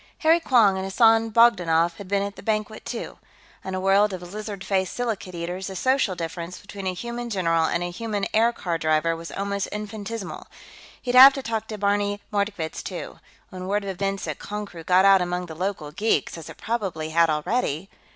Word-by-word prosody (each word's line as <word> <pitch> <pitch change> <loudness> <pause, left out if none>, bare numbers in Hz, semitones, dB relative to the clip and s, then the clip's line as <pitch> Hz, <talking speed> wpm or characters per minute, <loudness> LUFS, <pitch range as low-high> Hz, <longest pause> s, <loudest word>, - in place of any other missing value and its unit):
Harry 325 +1 +5
Quong 230 - +4
and 190 - -3
Hassan 225 +3 +4
Bogdanoff 175 -8 +4
had 200 - -9
been 200 +1 +1
at 200 0 -5
the - - -11
banquet, 215 -1 -2
too; 235 - -6 0.4
on 190 0 -4
a - - -2
world 195 +2 +3
of 180 0 -8
lizard 210 -2 -6
faced 190 -2 -1
silicate 220 -7 -3
eaters, 175 +3 -4
the 190 - -6
social 255 -2 +1
difference 170 +1 -5
between 200 -1 -7
a 185 - 0
human 235 +3 -5
general 165 -6 +1
and 170 +2 0
a 175 - -3
human 210 +1 -3
aircar 215 -7 +1
driver 155 +1 +1
was 165 0 -8
almost 200 0 -2
infinitesimal. 210 -1 -6 0.5
He'd 245 - -3
have 265 +2 +10
to 270 - -5
talk 225 -2 -3
to 215 - -6
Barney 205 0 0
Mordkovitz, 200 -6 -2
too; - - -7 0.3
when 185 -1 -7
word 205 +1 0
of 195 - -3
events 195 +1 -3
at - - -4
Konkrook 200 -5 -7
got 185 +1 +5
out 195 -1 +7
among 180 0 -2
the 165 - -8
local 175 -3 -3
geeks, 210 +8 0
as 165 -2 -9
it - - -11
probably 190 -9 -3
had 165 0 +4
already.... 155 - -1
195 Hz, 195 wpm, -24 LUFS, 175-215 Hz, 0.5 s, have